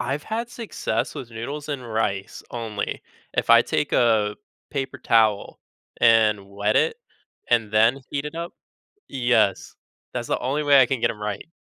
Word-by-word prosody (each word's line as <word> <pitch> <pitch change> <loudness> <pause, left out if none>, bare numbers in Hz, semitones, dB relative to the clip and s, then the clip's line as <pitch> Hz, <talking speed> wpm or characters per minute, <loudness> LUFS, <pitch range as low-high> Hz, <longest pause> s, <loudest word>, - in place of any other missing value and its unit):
I've 140 +2 -3
had 230 +2 -3
success 230 -3 -3
with 120 - -7
noodles 140 +7 -6
and 135 -4 -4
rice 100 -3 -2
only. 110 -4 -4 0.3
If - - -1
I - - +8
take - - -1
a 110 -3 +3 0.3
paper 135 -2 -4
towel, 110 -4 +2 0.4
and 110 -4 +4
wet 100 +2 0
it, 460 - +2 0.5
and 115 -3 +2
then 115 +5 +3
heat 140 0 -2
it 150 +1 -6
up 170 +1 -5 0.6
Yes, 120 -6 +1 0.4
that's - - -4
the - - 0
only 145 +4 -1
way 145 -1 +6
I - - +6
can 125 +1 -2
get - - +3
'em 105 - -12
right. 105 -1 -4
120 Hz, 165 wpm, -23 LUFS, 105-140 Hz, 0.6 s, I